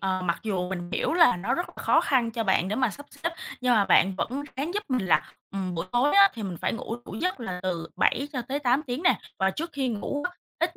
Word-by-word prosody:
ờ, 190 -1 0
mặc 170 -1 0
dù 185 -5 -1
mình 175 -2 -5
hiểu - - 0
là 335 - +6
nó 200 +9 -1
rất 350 - -2
là - - -10
khó - - +4
khăn 245 -4 +2
cho 225 0 -2
bạn 190 -2 +2
để 210 - -1
mà 255 -3 +2
sắp 285 +7 -11
xếp 335 +1 -4 0.3
nhưng 250 -1 +3
mà 205 -2 +4
bạn 195 0 +4
vẫn 265 +8 -2
ráng 310 +8 -2
giúp 415 - 0
mình 250 -7 0
là, 175 - +2 0.2
ừm, 190 -2 -3
buổi 165 +2 -3
tối 250 +4 +3
á 395 0 +8
thì 225 - -6
mình 185 -4 -4
phải - - 0
ngủ 230 0 -4
đủ - - -8
giấc 365 -6 -1
là 185 -6 -4
từ 170 -3 -2
7 280 +2 +2
cho 255 -4 -2
tới 280 +2 -1
8 260 +1 +2
tiếng 250 +5 -3
nè. 365 - +4 0.2
Và 190 0 +3
trước 330 - -4
khi 270 -2 -1
ngủ 245 +6 -3
á, 360 - -23 0.2
ít - - 0
235 Hz, 275 wpm, -27 LUFS, 190-280 Hz, 0.3 s, á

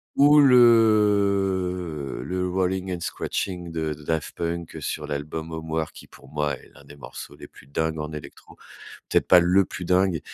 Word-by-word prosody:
ou 145 +1 +6
le 100 - +3
le 90 +1 -2
Rollin' 95 0 -1
and 90 - -3
scratchin' 90 0 -4
de 80 -2 -2
Daft 75 +1 -4
Punk 85 0 -4
sur 75 - -4
l'album 75 +3 -5
Homework. 80 0 -4
Qui - - -13
pour - - -17
moi 75 -1 -2
est - - -19
l'un - - -17
des 75 - -13
morceaux 65 - -10
les - - -11
plus 65 - -18
dingues 80 +2 -2
en 75 +1 -5
électro. 75 -1 -11 0.5
Peut-être - - +2
pas 90 -1 +7
le 90 +3 +3
plus 90 - -7
dingue, 90 -3 +2
90 Hz, 170 wpm, -24 LUFS, 80-95 Hz, 0.5 s, pas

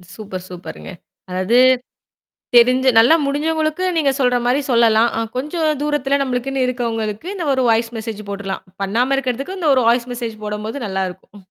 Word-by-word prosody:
Super, 190 -4 -7
சூப்பருங்க. 180 +1 -9 0.4
அதாவது, 185 +6 +1 1.0
தெரிஞ்சு 255 +2 +5
நல்லா 235 +8 +6
முடிஞ்சவங்களுக்கு 310 +4 -1
நீங்க 295 -4 +3
சொல்ற 250 -1 +3
மாதிரி 255 +4 +2
சொல்லலாம். 230 -1 +4
அ - - 0 0.2
கொஞ்சம் 305 +2 -1
தூரத்தில 285 -2 0
நம்மளுக்குன்னு 260 0 -1
இருக்கிறவங்களுக்கு 225 -1 -3
இந்த 365 -4 -4
ஒரு 260 -1 +1
வாய்ஸ் 230 0 +1
மெசேஜ் 220 -1 -6
போட்டுடலாம். 195 -1 -5 0.2
பண்ணாம 235 +7 +1
இருக்கிறதுக்கு, 275 +8 -3
இந்த 320 - +1
ஒரு 260 - +3
வாய்ஸ் 240 +1 +2
மெசேஜ் 235 -2 -5
போடும்போது 210 +4 -4
நல்லாயிருக்கும். 190 -1 -4
ம். - - -14
245 Hz, 150 wpm, -19 LUFS, 220-275 Hz, 1.0 s, நல்லா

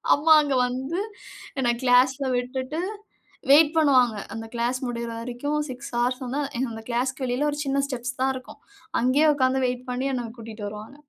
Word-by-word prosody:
அம்மா 315 +2 +5
அங்க 285 -3 0
வந்து, 265 +8 -3 0.6
என்ன 245 -2 +2
க்ளாஸ்ல 260 +2 +4
விட்டுட்டு, 260 +5 -3 0.7
வெயிட் 300 +1 +7
பண்ணுவாங்க. 255 -7 +4 0.2
அந்த 225 0 -6
க்ளாஸ் 240 +2 0
முடியற 235 -1 -4
வரைக்கும் 250 +5 -3
6:00 255 +1 -7
ஹார்ஸ் 250 +2 0
வந்தா, 275 +4 -2 0.2
என்னோட 225 -4 -3
க்ளாஸ்க்கு 260 +3 -1
வெளில 255 +4 0
ஒரு 290 - -4
சின்ன 275 0 +1
ஸ்டெப்ஸ் 255 -1 -4
தான் 265 0 +3
இருக்கும். 255 - -10 0.4
அங்கயே 265 +5 +3
உக்காந்து 260 -1 +2
வெயிட் 250 +1 -4
பண்ணி 255 +2 -1
என்ன 240 -3 -3
கூட்டிட்டு 220 -2 -7
வருவாங்க. 215 +7 -9
255 Hz, 160 wpm, -25 LUFS, 245-275 Hz, 0.7 s, வெயிட்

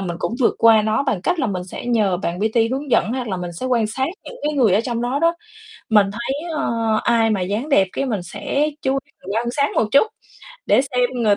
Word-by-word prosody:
mình 175 -3 -4
cũng 230 - -2
vượt 235 - +3
qua 225 -2 +6
nó 220 +5 +1
bằng 220 -10 -1
cách 355 - 0
là 265 - +1
mình 180 -3 -3
sẽ 185 - -8
nhờ 215 -7 +2
bạn 175 -1 -3
PT 225 +2 +1
hướng 275 +1 -4
dẫn 225 - +2
hoặc 255 -3 -3
là 190 - -2
mình 175 -1 -5
sẽ 220 +10 -5
quan 235 -4 +2
sát 260 +5 -2 0.2
những - - -9
cái 300 +1 0
người 235 -9 +3
ở 210 - +4
trong 235 -1 -3
đó 250 +3 -1
đó, 335 +2 +2 0.6
mình 210 -2 +5
thấy, 270 +9 -4
ơ, 295 - -1 0.3
ai 225 -1 +3
mà 200 -3 0
dáng 210 +10 -2
đẹp 195 -10 +4
cái 275 - -2
mình 210 -7 -2
sẽ 215 - -2
chú 265 - +1
mình 210 -7 -6
quan 235 +1 0
sát 280 +3 +1
một - - +3
chút, 280 +10 +6 0.6
để - - +5
xem 250 -3 0
người 220 -4 +2
230 Hz, 250 wpm, -20 LUFS, 205-265 Hz, 0.6 s, qua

